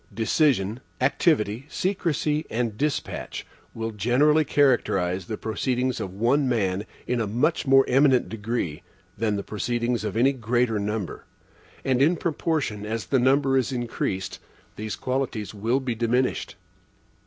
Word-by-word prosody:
Decision, 110 0 +1 0.2
activity, 130 - +1
secrecy, 160 -5 -1
and 115 -2 -1
despatch 145 +4 -3 0.3
will 115 0 -3
generally 130 +9 +3
characterize 95 - +2
the 110 - -4
proceedings 125 +3 -1
of 95 - -4
one 125 +8 +2
man 100 -4 0 0.2
in 125 -1 0
a 110 - -1
much 135 +10 0
more 135 0 +6
eminent 135 -1 +4
degree 110 -8 -3 0.3
than 110 -2 0
the 100 - -3
proceedings 120 +3 -1
of 110 - -3
any 135 +4 +4
greater 120 -2 0
number; 105 -1 -3 0.6
and 130 -1 +2
in 160 +6 +4
proportion 155 -10 -1
as 110 +1 -3
the 135 - +2
number 135 +2 +3
is 130 0 +1
increased, 100 -6 -3 0.4
these 110 0 -4
qualities 130 -5 -2
will 115 +5 0
be 130 -3 -2
diminished. 120 +3 0
120 Hz, 135 wpm, -25 LUFS, 110-135 Hz, 0.6 s, more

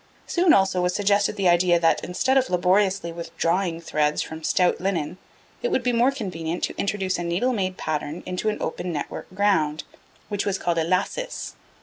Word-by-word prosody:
Soon, 350 -1 +3
also, 190 - +3
was 180 0 0
suggested 205 0 +2
the 195 -3 +1
idea 175 0 +4
that, 165 -1 +2
instead 260 +9 0
of 265 -1 +3
laboriously 185 0 +2
withdrawing 170 +1 -1
threads 150 -2 0
from 160 0 -8
stout 180 +2 +2
linen, 180 -3 -2 0.4
it 485 - 0
would 260 - 0
be 245 0 +1
more 240 +3 +4
convenient 180 -9 -4
to - - -1
introduce 195 -2 -1
a - - -2
needle 180 +10 0
made 185 -4 -2
pattern 150 +1 -3
into 185 +4 -1
an 210 - -3
open 175 +2 -3
network 150 -3 -5
ground, 165 -7 +1 0.4
which 205 -1 -2
was 200 -2 -1
called 170 -2 0
a - - +2
lacis. 185 - -2
185 Hz, 185 wpm, -24 LUFS, 170-205 Hz, 0.4 s, idea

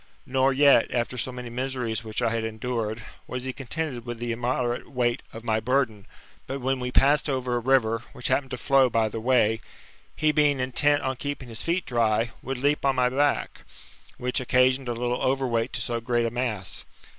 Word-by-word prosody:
Nor 135 +1 +2
yet, 140 -3 +5
after 120 0 -1
so 125 +1 -2
many 125 -1 -7
miseries 125 -2 -2
which 110 -1 -3
I 115 - +2
had 115 0 -1
endured, 110 0 -3 0.2
was 125 0 -4
he 130 0 -3
contented 135 -1 -4
with 120 0 -5
the 120 0 -3
immoderate 120 +1 -1
weight 120 -3 0
of 115 - -9
my 110 -2 +1
burden; 115 -3 0 0.4
but 135 - -3
when 130 +1 0
We 125 0 -3
passed 145 +4 +3
over 130 -2 -1
a - - +1
river, 115 -2 +2
which 125 - -5
happened 135 -2 +1
to 125 - -4
flow 135 0 +4
by 110 -1 +1
the 115 - -5
way, 115 -2 +2 0.5
he 155 0 +2
being 145 -2 +3
intent 145 +3 +2
on 130 -1 -1
keeping 140 -2 -5
his 115 +1 -4
feet 175 +2 0
dry, 115 -1 +1
would 135 +1 -4
leap 145 +3 +1
on 135 -1 +2
my 125 -1 +3
back, 140 +3 0 0.6
which 125 0 -1
occasioned 130 0 +2
a - - 0
little 120 +1 -2
over 135 +1 +1
weight 115 0 0
to 120 - -2
so 115 0 -2
great 120 0 +1
a 115 - -1
mass. 115 -6 -3
125 Hz, 200 wpm, -26 LUFS, 115-135 Hz, 0.6 s, yet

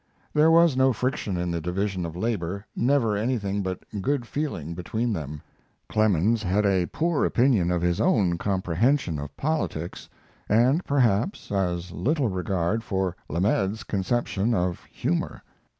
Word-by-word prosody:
There 150 +2 +5
was 165 -3 +5
no 130 0 +4
friction 115 -5 -2
in 90 0 -1
the 85 -1 -2
division 90 +1 -2
of 80 - -8
labor, 100 -1 -2
never 125 -4 +2
anything 100 -3 -1
but 95 -1 -4 0.2
good 135 +1 0
feeling 115 - -3
between 110 +7 -2
them. 75 -4 -5 0.5
Clemens 110 +1 +2
had 100 +1 +1
a 95 -3 +2
poor 165 -1 0
opinion 120 -8 +3
of 90 -1 0
his 90 0 +1
own 95 - +2
comprehension 95 - +1
of 70 0 -8
politics, 135 - -3 0.4
and 125 - +4
perhaps 125 - +1
as 90 -3 -1
little 140 - 0
regard 95 +3 -1
for 95 -4 -1
Lamed's 95 +4 0
conception 105 +3 0
of 90 -2 -1
humor. 85 - -3
100 Hz, 140 wpm, -25 LUFS, 90-120 Hz, 0.5 s, There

